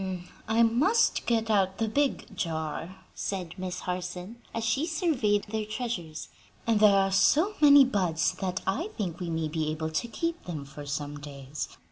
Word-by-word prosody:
"I 225 Hz, +1 st, +4 dB
must 280 Hz, -, +3 dB
get 225 Hz, -1 st, +1 dB
out 190 Hz, -2 st, +2 dB
the 225 Hz, -, 0 dB
big 265 Hz, -3 st, 0 dB
jar," 165 Hz, +1 st, -3 dB, 0.2 s
said 185 Hz, -5 st, -4 dB
Miss 185 Hz, 0 st, -4 dB
Harson 180 Hz, +4 st, -4 dB
as 230 Hz, -, -3 dB
she 270 Hz, +8 st, +1 dB
surveyed 265 Hz, -, +1 dB
their 220 Hz, +1 st, -3 dB
treasures, 215 Hz, -10 st, -4 dB, 0.4 s
"and 225 Hz, -2 st, +3 dB
there 210 Hz, -2 st, +7 dB
are 195 Hz, 0 st, +2 dB
so 315 Hz, -, +4 dB
many 285 Hz, -2 st, +9 dB
buds 180 Hz, -9 st, +1 dB
that 185 Hz, -1 st, -1 dB
I 325 Hz, -, -1 dB
think 175 Hz, -5 st, -3 dB
we 175 Hz, -2 st, -3 dB
may 160 Hz, -1 st, -1 dB
be 155 Hz, 0 st, -1 dB
able 160 Hz, +1 st, -3 dB
to 160 Hz, +9 st, -1 dB
keep 335 Hz, +8 st, -3 dB
them 155 Hz, -5 st, -5 dB
for 145 Hz, +1 st, -10 dB
some 145 Hz, 0 st, -4 dB
days. 140 Hz, 0 st, -6 dB
195 Hz, 170 wpm, -28 LUFS, 160-230 Hz, 0.4 s, many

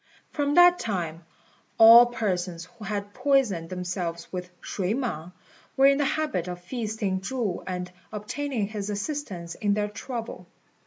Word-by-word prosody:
From 290 Hz, -1 st, 0 dB
that 355 Hz, 0 st, +7 dB
time 170 Hz, -6 st, -3 dB, 0.5 s
all 230 Hz, +2 st, +10 dB
persons 180 Hz, -7 st, -2 dB
who 220 Hz, +3 st, -13 dB
had 205 Hz, 0 st, -4 dB
poisoned 250 Hz, -11 st, +1 dB
themselves 180 Hz, -2 st, -4 dB
with 180 Hz, 0 st, -4 dB
shui 195 Hz, +2 st, -2 dB
mang 180 Hz, -, -3 dB, 0.5 s
were 270 Hz, -, +6 dB
in 275 Hz, +1 st, +5 dB
the 290 Hz, -, +2 dB
habit 265 Hz, -, -1 dB
of 180 Hz, 0 st, -5 dB
feasting 210 Hz, -1 st, -3 dB
Chu 220 Hz, -3 st, -2 dB
and 180 Hz, -1 st, -4 dB, 0.2 s
obtaining 220 Hz, +2 st, -3 dB
his 210 Hz, -1 st, -5 dB
assistance 205 Hz, -, -4 dB
in 205 Hz, -1 st, 0 dB
their 210 Hz, 0 st, -1 dB
trouble. 235 Hz, +2 st, -6 dB
205 Hz, 145 wpm, -26 LUFS, 180-245 Hz, 0.5 s, all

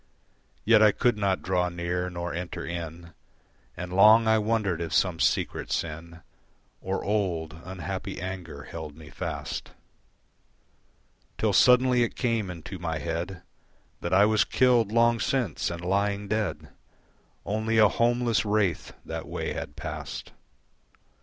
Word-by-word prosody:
Yet 110 Hz, -1 st, +6 dB
I 105 Hz, -1 st, +7 dB
could 120 Hz, +3 st, +1 dB
not 100 Hz, -2 st, 0 dB
draw 90 Hz, +1 st, +1 dB
near 90 Hz, +1 st, -2 dB
nor 85 Hz, -1 st, -4 dB
enter 85 Hz, +1 st, -5 dB
in, 85 Hz, 0 st, -6 dB, 0.6 s
And 90 Hz, 0 st, -6 dB
long 110 Hz, +4 st, +7 dB
I 110 Hz, 0 st, +4 dB
wondered 105 Hz, -5 st, 0 dB
if 85 Hz, -, -2 dB
some 90 Hz, -4 st, +2 dB
secret -, -, 0 dB
sin 85 Hz, +1 st, -4 dB, 0.6 s
Or 95 Hz, +1 st, -2 dB
old, 90 Hz, -7 st, -1 dB
unhappy 90 Hz, -2 st, -5 dB
anger 90 Hz, -5 st, -6 dB
held 80 Hz, -2 st, -8 dB
me 75 Hz, -2 st, -12 dB
fast; -, -, -5 dB, 1.6 s
Till -, -, +1 dB
suddenly 125 Hz, 0 st, +5 dB
it 120 Hz, -, 0 dB
came 115 Hz, -6 st, 0 dB
into 90 Hz, +2 st, -7 dB
my 80 Hz, -2 st, -2 dB
head 85 Hz, +3 st, -4 dB, 0.6 s
That 85 Hz, -, -4 dB
I 100 Hz, +2 st, +6 dB
was 110 Hz, 0 st, +3 dB
killed 120 Hz, -5 st, +3 dB
long 115 Hz, 0 st, +3 dB
since 130 Hz, -4 st, -1 dB
and 85 Hz, -1 st, -6 dB
lying 100 Hz, +2 st, 0 dB
dead 105 Hz, 0 st, -2 dB, 0.8 s
Only 110 Hz, +3 st, 0 dB
a 110 Hz, -1 st, +7 dB
homeless 120 Hz, 0 st, +1 dB
wraith 105 Hz, -5 st, 0 dB
that -, -, -5 dB
way -, -, -3 dB
had -, -, -6 dB
passed. -, -, -6 dB
95 Hz, 135 wpm, -27 LUFS, 85-110 Hz, 1.6 s, I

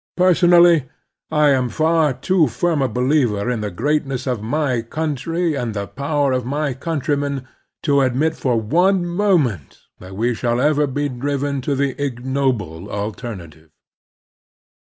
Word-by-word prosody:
Personally, 175 Hz, -5 st, +5 dB, 0.4 s
I 150 Hz, -2 st, +3 dB
am 130 Hz, -2 st, +1 dB
far 160 Hz, +3 st, +2 dB
too 165 Hz, +4 st, +2 dB
firm 160 Hz, +5 st, 0 dB
a 135 Hz, -, +2 dB
believer 125 Hz, -4 st, +1 dB
in 120 Hz, -3 st, -2 dB
the 105 Hz, -, -2 dB
greatness 135 Hz, -, -1 dB
of 125 Hz, -5 st, -2 dB
my 130 Hz, +1 st, -1 dB
coimtry 160 Hz, +6 st, -2 dB
and 120 Hz, -5 st, -3 dB
the 100 Hz, -1 st, -2 dB
power 140 Hz, +3 st, -1 dB
of 130 Hz, -1 st, 0 dB
my 140 Hz, +2 st, -2 dB
coimtrymen 140 Hz, -1 st, -2 dB, 0.4 s
to 140 Hz, -1 st, +3 dB
admit 135 Hz, +5 st, +1 dB
for 125 Hz, -6 st, 0 dB
one 175 Hz, -, +2 dB
moment 170 Hz, -, 0 dB, 0.2 s
that 95 Hz, +1 st, -10 dB
we 120 Hz, +4 st, 0 dB
shall 120 Hz, +1 st, -1 dB
ever 150 Hz, +1 st, +2 dB
be 145 Hz, +2 st, -2 dB
driven 140 Hz, +1 st, -2 dB
to 140 Hz, +2 st, -1 dB
the 135 Hz, 0 st, 0 dB
ignoble 125 Hz, -, -2 dB
alterna 105 Hz, -4 st, -5 dB
tive. 80 Hz, +1 st, -22 dB
140 Hz, 145 wpm, -20 LUFS, 120-155 Hz, 0.4 s, Personally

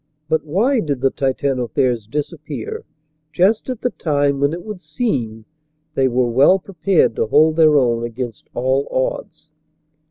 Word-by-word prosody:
But 160 Hz, 0 st, 0 dB
why 215 Hz, -, +1 dB
did 145 Hz, -, -2 dB
the 135 Hz, 0 st, +2 dB
Titanotheres 130 Hz, -4 st, -1 dB
disappear 150 Hz, -1 st, -5 dB, 0.5 s
just 195 Hz, +9 st, +2 dB
at 250 Hz, -3 st, -4 dB
the 245 Hz, -, 0 dB
time 145 Hz, -3 st, 0 dB
when 140 Hz, +1 st, +2 dB
it 170 Hz, +1 st, -6 dB
would 210 Hz, -4 st, -7 dB
seem 135 Hz, -, -3 dB, 0.5 s
they 135 Hz, -4 st, +2 dB
were 125 Hz, 0 st, +1 dB
well 140 Hz, +10 st, +5 dB
prepared 190 Hz, -, +1 dB
to -, -, 0 dB
hold 155 Hz, +6 st, +4 dB
their 155 Hz, -2 st, +5 dB
own 120 Hz, -3 st, +1 dB
against 120 Hz, 0 st, -6 dB
all 130 Hz, +3 st, 0 dB
odds? 155 Hz, +4 st, -4 dB
145 Hz, 150 wpm, -19 LUFS, 125-165 Hz, 0.5 s, well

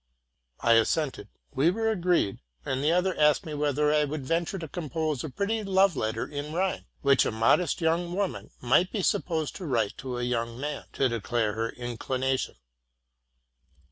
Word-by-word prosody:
'' -, -, -48 dB
I 115 Hz, -, +5 dB
assented; 115 Hz, 0 st, +1 dB, 0.3 s
we 140 Hz, +4 st, +3 dB
were 225 Hz, +4 st, 0 dB
agreed; 175 Hz, -, +1 dB, 0.3 s
and 130 Hz, +1 st, -1 dB
the 155 Hz, -, +3 dB
other 180 Hz, +1 st, +2 dB
asked 150 Hz, -1 st, +4 dB
me 155 Hz, -, -5 dB
whether 150 Hz, 0 st, +1 dB
I 150 Hz, 0 st, +4 dB
would 145 Hz, -1 st, -4 dB
venture 170 Hz, +6 st, -1 dB
to 165 Hz, -3 st, -6 dB
compose 155 Hz, -3 st, -3 dB
a 155 Hz, -, -4 dB
pretty 210 Hz, -, -1 dB
love 195 Hz, -2 st, +3 dB
letter 110 Hz, -2 st, -1 dB
in 145 Hz, +1 st, -6 dB
rhyme, 185 Hz, +2 st, -1 dB, 0.2 s
which 140 Hz, -1 st, +5 dB
a -, -, -1 dB
modest 115 Hz, +12 st, +2 dB
young 170 Hz, +2 st, +1 dB
woman 200 Hz, -2 st, -2 dB
might 145 Hz, +9 st, +3 dB
be 200 Hz, -, -2 dB
supposed 160 Hz, -4 st, 0 dB
to 185 Hz, -, -7 dB
write 115 Hz, -7 st, 0 dB
to 125 Hz, -2 st, -4 dB
a 120 Hz, -, -2 dB
young 120 Hz, -1 st, -2 dB
man, 145 Hz, +1 st, -4 dB
to 135 Hz, -, +2 dB
declare 115 Hz, -2 st, -1 dB
her 115 Hz, +1 st, -2 dB
inclination. 130 Hz, +2 st, -2 dB
150 Hz, 175 wpm, -27 LUFS, 120-175 Hz, 0.3 s, I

